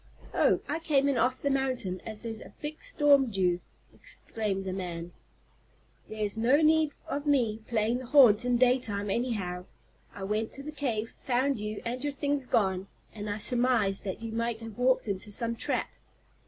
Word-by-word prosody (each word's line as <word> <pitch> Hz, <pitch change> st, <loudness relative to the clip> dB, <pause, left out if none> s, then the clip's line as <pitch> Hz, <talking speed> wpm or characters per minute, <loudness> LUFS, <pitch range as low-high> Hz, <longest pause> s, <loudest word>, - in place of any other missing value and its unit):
"Oh, -, -, +3 dB
I 305 Hz, +3 st, -1 dB
came 285 Hz, -4 st, +2 dB
in 280 Hz, -, +2 dB
off 255 Hz, +1 st, +1 dB
the 280 Hz, -, +2 dB
mountain, 255 Hz, -9 st, -1 dB
as 215 Hz, 0 st, -6 dB
there's 225 Hz, -1 st, -4 dB
a -, -, -12 dB
big 300 Hz, +1 st, -6 dB
storm 290 Hz, -, +4 dB
due," 180 Hz, -4 st, +1 dB, 0.3 s
explained 210 Hz, -, -3 dB
the 185 Hz, -, -2 dB
man. 175 Hz, -2 st, -5 dB, 1.0 s
"There 215 Hz, 0 st, -3 dB
was 210 Hz, +2 st, -1 dB
no 240 Hz, +5 st, +4 dB
need 310 Hz, 0 st, +4 dB
of 290 Hz, +1 st, -3 dB
me 240 Hz, -7 st, +2 dB
playing 230 Hz, +1 st, +1 dB
the 255 Hz, -, -8 dB
haunt 245 Hz, -6 st, +7 dB
in 245 Hz, -1 st, +2 dB
daytime, 235 Hz, -5 st, +2 dB
anyhow. 195 Hz, -7 st, -2 dB, 0.5 s
I 200 Hz, -, -6 dB
went 215 Hz, +3 st, -1 dB
to 275 Hz, -, -6 dB
the 305 Hz, -, -6 dB
cave, 235 Hz, -7 st, -2 dB
found 260 Hz, 0 st, +1 dB
you 210 Hz, 0 st, -5 dB
and 250 Hz, +3 st, -3 dB
your 290 Hz, -1 st, -1 dB
things 280 Hz, -1 st, -1 dB
gone, 190 Hz, -4 st, +1 dB, 0.3 s
and 210 Hz, -1 st, -5 dB
I 205 Hz, -, -2 dB
surmised 235 Hz, -4 st, +1 dB
that 195 Hz, +3 st, -4 dB
you 225 Hz, -, -4 dB
might 230 Hz, 0 st, -1 dB
have 225 Hz, 0 st, -9 dB
walked 255 Hz, -1 st, +3 dB
into 200 Hz, +1 st, -3 dB
some 230 Hz, +2 st, -1 dB
trap." -, -, -2 dB
230 Hz, 180 wpm, -29 LUFS, 205-270 Hz, 1.0 s, haunt